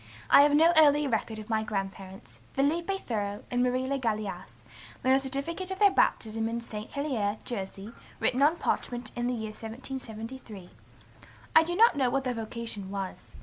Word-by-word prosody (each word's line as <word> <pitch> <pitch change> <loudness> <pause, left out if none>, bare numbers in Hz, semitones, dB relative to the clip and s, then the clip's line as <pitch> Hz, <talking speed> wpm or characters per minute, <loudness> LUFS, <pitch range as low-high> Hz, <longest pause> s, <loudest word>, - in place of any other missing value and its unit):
I - - +9
have 290 0 +5
no 325 +3 +6
earlier 295 -2 +6
record 220 -1 -1
of 215 -1 -8
my 220 -2 +1
grandparents, 195 - -6
Philippe 335 +8 +1
Thoreau 205 - -3
and 245 0 +1
Marie 250 +1 +1
Le 275 +1 -1
Gallais, 210 -6 -2 0.6
than 260 - +3
a 265 - +5
certificate 280 +7 -4
of 380 - -4
their 405 0 +6
baptism 225 -6 +1
in 230 +1 -2
St. 215 -2 -7
Helier, 240 -8 -1
Jersey, 200 -1 -5 0.3
written 255 - +1
on 300 +4 +5
parchment 245 -6 -2
in 240 0 -1
the 250 - 0
year 220 -2 -4
1773. 225 -3 -8 0.8
I 320 - +10
do 345 +2 -2
not 455 0 +6
know 265 -3 +2
what 270 +2 0
their 255 -1 -1
vocation 225 -3 -5
was. 195 -1 -6
240 Hz, 175 wpm, -29 LUFS, 215-280 Hz, 0.8 s, I